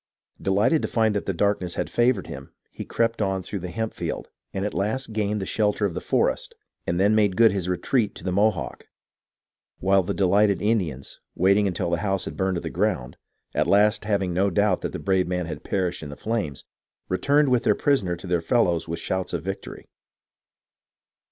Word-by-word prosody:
Delighted 105 Hz, -, +2 dB
to -, -, -1 dB
find 110 Hz, -2 st, +1 dB
that 100 Hz, -, -2 dB
the -, -, +2 dB
darkness 95 Hz, -1 st, 0 dB
had -, -, -1 dB
favoured 120 Hz, -5 st, +2 dB
him, 70 Hz, 0 st, -9 dB, 0.2 s
he -, -, -7 dB
crept 115 Hz, -1 st, 0 dB
on 95 Hz, -2 st, 0 dB
through 100 Hz, -, -5 dB
the 90 Hz, 0 st, -6 dB
hemp 110 Hz, +4 st, -3 dB
field, -, -, -4 dB, 0.2 s
at 100 Hz, +2 st, -2 dB
last 110 Hz, +5 st, -2 dB
gained 105 Hz, -1 st, 0 dB
the 95 Hz, -, -3 dB
shelter 105 Hz, 0 st, +1 dB
of 95 Hz, -, -1 dB
the 90 Hz, -, -4 dB
forest, -, -, 0 dB, 0.3 s
and 85 Hz, +1 st, 0 dB
then 100 Hz, +3 st, +4 dB
made 105 Hz, -4 st, +2 dB
good 115 Hz, -2 st, +6 dB
his 95 Hz, -2 st, -2 dB
retreat 105 Hz, +4 st, 0 dB
to -, -, -10 dB
the 95 Hz, -, -1 dB
Mohawk; 100 Hz, +1 st, 0 dB, 0.9 s
while 95 Hz, +1 st, +3 dB
the 95 Hz, +2 st, -3 dB
delighted 100 Hz, +1 st, +3 dB
Indians, 90 Hz, -, -1 dB, 0.2 s
waiting 100 Hz, +3 st, +3 dB
until 90 Hz, -2 st, -2 dB
the 85 Hz, -, +2 dB
house 95 Hz, 0 st, -1 dB
had -, -, -6 dB
burned 95 Hz, -1 st, 0 dB
to 85 Hz, -, -2 dB
the -, -, -5 dB
ground, 60 Hz, 0 st, -1 dB, 0.4 s
at -, -, +1 dB
last 105 Hz, +2 st, +3 dB
having 100 Hz, -4 st, 0 dB
no 95 Hz, +3 st, +2 dB
doubt 100 Hz, 0 st, +2 dB
that -, -, -3 dB
the -, -, -4 dB
brave 95 Hz, -2 st, +1 dB
man 90 Hz, -1 st, -1 dB
had 80 Hz, -2 st, -7 dB
perished 90 Hz, -3 st, -1 dB
in 75 Hz, -, -7 dB
the 70 Hz, -, -7 dB
flames, 105 Hz, -, -3 dB, 0.4 s
returned 140 Hz, +10 st, +2 dB
with 125 Hz, -2 st, +2 dB
their -, -, +3 dB
prisoner 115 Hz, -12 st, +1 dB
to 85 Hz, -, -11 dB
their 90 Hz, -2 st, 0 dB
fellows 85 Hz, -4 st, +1 dB
with 85 Hz, 0 st, -3 dB
shouts 95 Hz, -1 st, -2 dB
of 85 Hz, -, -2 dB
victory. 95 Hz, +2 st, -6 dB
95 Hz, 200 wpm, -24 LUFS, 90-105 Hz, 0.9 s, good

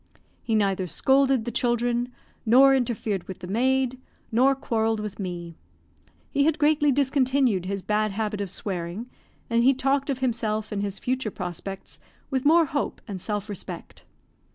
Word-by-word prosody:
He 225 Hz, -, -1 dB
neither 195 Hz, -3 st, +1 dB
scolded 265 Hz, +3 st, +2 dB
the 240 Hz, -, -3 dB
children 240 Hz, +1 st, 0 dB, 0.3 s
nor 260 Hz, +4 st, +6 dB
interfered 225 Hz, -7 st, -1 dB
with 190 Hz, -, -6 dB
the 185 Hz, -, -9 dB
maid, 255 Hz, +4 st, +1 dB, 0.3 s
nor 260 Hz, +4 st, +4 dB
quarrelled 225 Hz, -4 st, 0 dB
with 210 Hz, -1 st, -6 dB
me. 175 Hz, -3 st, -6 dB, 0.7 s
He 280 Hz, 0 st, +2 dB
had 315 Hz, -1 st, +2 dB
greatly 295 Hz, -1 st, +3 dB
discontinued 260 Hz, -7 st, +2 dB
his 195 Hz, -1 st, -3 dB
bad 215 Hz, -1 st, 0 dB
habit 210 Hz, 0 st, -2 dB
of 200 Hz, -, -3 dB
swearing, 190 Hz, +4 st, -3 dB, 0.4 s
and 235 Hz, 0 st, +2 dB
he 265 Hz, +2 st, +5 dB
talked 275 Hz, +2 st, 0 dB
of 275 Hz, -, 0 dB
himself 225 Hz, -4 st, -1 dB
and 205 Hz, -1 st, -2 dB
his 200 Hz, -1 st, -3 dB
future 255 Hz, -2 st, -2 dB
prospects 190 Hz, +1 st, -6 dB, 0.3 s
with 260 Hz, 0 st, -1 dB
more 330 Hz, +2 st, +6 dB
hope 285 Hz, -1 st, -2 dB
and 195 Hz, -4 st, -6 dB
self 210 Hz, 0 st, -3 dB
respect. 205 Hz, -4 st, -8 dB
230 Hz, 155 wpm, -25 LUFS, 200-265 Hz, 0.7 s, nor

